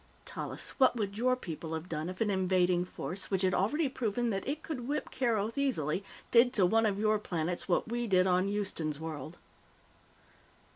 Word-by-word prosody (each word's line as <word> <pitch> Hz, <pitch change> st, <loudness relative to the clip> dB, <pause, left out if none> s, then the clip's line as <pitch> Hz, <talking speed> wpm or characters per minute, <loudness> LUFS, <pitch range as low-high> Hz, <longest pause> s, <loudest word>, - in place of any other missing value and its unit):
"Tallis, -, -, -5 dB
what 260 Hz, -2 st, +5 dB
would 200 Hz, -4 st, -2 dB
your 255 Hz, +3 st, +2 dB
people 160 Hz, -7 st, -5 dB
have 160 Hz, +2 st, -5 dB
done 160 Hz, 0 st, -3 dB
if 185 Hz, +2 st, -7 dB
an 210 Hz, -2 st, +2 dB
invading 185 Hz, -2 st, +2 dB
force, 180 Hz, +1 st, -5 dB
which 190 Hz, -1 st, +1 dB
had 185 Hz, -1 st, +3 dB
already 285 Hz, -, +2 dB
proven 240 Hz, -2 st, -1 dB
that 195 Hz, -1 st, -3 dB
it 300 Hz, +3 st, -3 dB
could 250 Hz, -7 st, -5 dB
whip 295 Hz, +2 st, -2 dB
Keroth 230 Hz, -1 st, 0 dB
easily, 190 Hz, -, 0 dB, 0.3 s
did 245 Hz, +1 st, +6 dB
to 200 Hz, -7 st, +4 dB
one 225 Hz, +4 st, +3 dB
of 200 Hz, -2 st, 0 dB
your 215 Hz, 0 st, +2 dB
planets 175 Hz, -1 st, -3 dB
what 175 Hz, -, +2 dB
we 240 Hz, +1 st, -2 dB
did 185 Hz, -2 st, +4 dB
on 185 Hz, +1 st, +3 dB
Houston's 190 Hz, -7 st, -2 dB
World?" 160 Hz, 0 st, -6 dB
200 Hz, 185 wpm, -31 LUFS, 180-235 Hz, 0.3 s, did